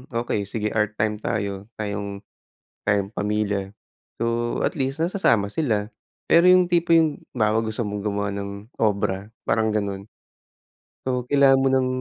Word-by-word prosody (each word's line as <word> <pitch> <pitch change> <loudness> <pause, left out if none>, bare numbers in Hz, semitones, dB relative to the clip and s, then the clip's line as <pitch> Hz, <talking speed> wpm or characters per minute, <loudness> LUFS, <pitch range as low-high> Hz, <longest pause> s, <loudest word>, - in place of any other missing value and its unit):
okay, 115 -4 -1
sige, 105 0 -2
art 105 -1 0
time 105 0 -1
tayo, 100 -2 -3
tayong, 100 -1 -4 0.6
tayong 100 0 0
pamilya, 105 -1 -1 0.5
so, 115 +1 -1
at - - 0
least 135 -4 -2
nasasama 160 - +1
sila. 110 -9 0 0.4
Pero, 170 - +6
yung 185 0 +6
tipo 170 -1 +1
yung 155 -3 +1 0.2
halimbawa 110 0 +3
gusto 110 +1 -2
mong 105 0 -4
gumawa 100 -1 -1
ng 100 0 -4 0.3
obra, 100 -2 0 0.2
parang 110 -1 +2
ganun, 100 -1 -2 1.0
so, 125 -1 0
kailangan 135 0 +5
mo 135 - +3
ng. 130 -1 +3
110 Hz, 145 wpm, -23 LUFS, 100-130 Hz, 1.0 s, Pero